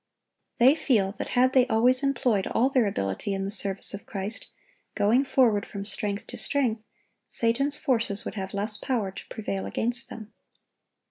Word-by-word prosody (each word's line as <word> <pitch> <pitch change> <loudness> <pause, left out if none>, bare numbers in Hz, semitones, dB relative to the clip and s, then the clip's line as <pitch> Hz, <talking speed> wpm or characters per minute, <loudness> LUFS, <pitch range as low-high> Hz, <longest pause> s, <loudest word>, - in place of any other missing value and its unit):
They 260 +2 +6
feel 225 -11 +1
that - - -3
had 255 +1 +4
they 255 -1 +4
always 250 +3 +3
employed 250 -7 +1
all 255 +3 +2
their 255 -5 +2
ability 100 - -2
in 195 0 -3
the 195 - -4
service 195 -2 +2
of 200 - -8
Christ, 200 +2 -4 0.5
going 220 +6 +3
forward 230 -7 +3
from 200 0 -7
strength 205 -1 -3
to - - -9
strength, 235 -6 0 0.5
Satan's 275 +6 +1
forces 225 -6 0
would - - -4
have 190 -2 -5
less 210 +1 +1
power 215 -4 -2
to - - -10
prevail 195 -3 -4
against 240 +1 -2
them. 220 -1 -10
220 Hz, 165 wpm, -26 LUFS, 200-255 Hz, 0.5 s, They